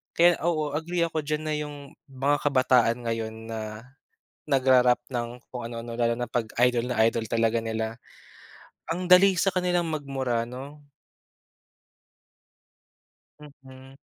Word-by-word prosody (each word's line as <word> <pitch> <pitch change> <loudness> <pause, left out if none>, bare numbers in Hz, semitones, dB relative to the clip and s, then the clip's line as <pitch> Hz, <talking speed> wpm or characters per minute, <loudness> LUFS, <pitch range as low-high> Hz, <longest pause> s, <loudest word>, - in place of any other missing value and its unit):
Kaya 175 0 +5
oo, 155 -4 0
agree 170 +3 -1
ako 160 -2 -3
diyan 150 +1 -2
na 155 - -2
yung 150 -1 -5 0.3
mga 135 +2 0
kabataan 125 -3 +3
ngayon 110 -1 -3
na 115 -1 -5 0.9
nagra-rap 130 -3 +4
ng 120 -1 -2 0.2
kung 125 -2 -5
ano-ano 115 0 -7
lalo 115 -1 +1
na 120 0 -4
'pag 115 -3 -2 0.2
idol 120 0 -1
na 125 -3 -1
idol 115 -1 -2
talaga 115 0 +1
nila, 110 0 -3 0.9
ang 180 +2 -2
dali 190 +1 +7
sa 195 - +3
kanilang 180 -2 +1
magmura, 135 -6 -2
'no? 140 +4 -10 2.5
Mhm. 135 -2 -15
130 Hz, 130 wpm, -26 LUFS, 120-150 Hz, 2.5 s, dali